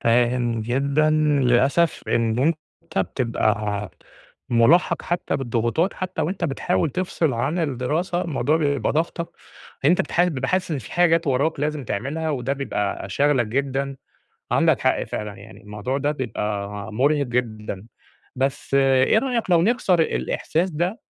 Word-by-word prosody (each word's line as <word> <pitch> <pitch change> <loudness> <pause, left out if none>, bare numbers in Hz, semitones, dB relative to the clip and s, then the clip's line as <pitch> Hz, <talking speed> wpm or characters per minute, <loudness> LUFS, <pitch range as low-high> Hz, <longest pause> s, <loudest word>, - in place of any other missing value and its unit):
فاهم 120 0 +2
جدًا، 140 +6 +1 0.3
للأسف 135 +7 +2
إن 115 -1 +1 0.4
أنت - - -5
بتبقى 105 -1 -1 0.6
مُلاحَق 120 +10 +4
حتى 175 0 -1
بالضغوطات، 120 - 0
حتى 185 -3 -3
وأنت 175 +5 -2
بتحاول 165 +1 0
تفصل 175 -4 -1
عن 135 +9 -1
الدراسة، 160 +5 -1
الموضوع 155 -1 0
بيبقى 145 -3 0
ضاغطك، 165 +2 -1 0.6
أنت 170 +5 +4
بتح 175 - +2
بتبقى 135 -7 -2
حاسس 185 -2 0
إن 145 - -1
في - - -10
حاجات 170 -1 +3
وراك 140 +3 +1
لازم 150 -2 -2
تعملها، 150 +10 -2
وده 135 -1 -1
بيبقى 105 -8 -3
شاغلك 130 +2 +2
جدًا، 135 +3 -2 0.6
عندك - - +3
حق - - +2
فعلًا، 105 -1 -5
يعني 100 +2 -13
الموضوع 105 +5 -4
ده 145 +1 0
بيبقى 105 -7 -3 0.2
مرهِق 140 +5 +2
جدًا، 110 -4 -3 0.5
بس 135 +1 -2
إيه 135 +7 +4
رأيك 240 -5 -2
لو 170 -2 +5
نكسر 195 -4 +2
الإحساس 165 +2 -1
ده 175 - -2
140 Hz, 135 wpm, -23 LUFS, 120-165 Hz, 0.6 s, لو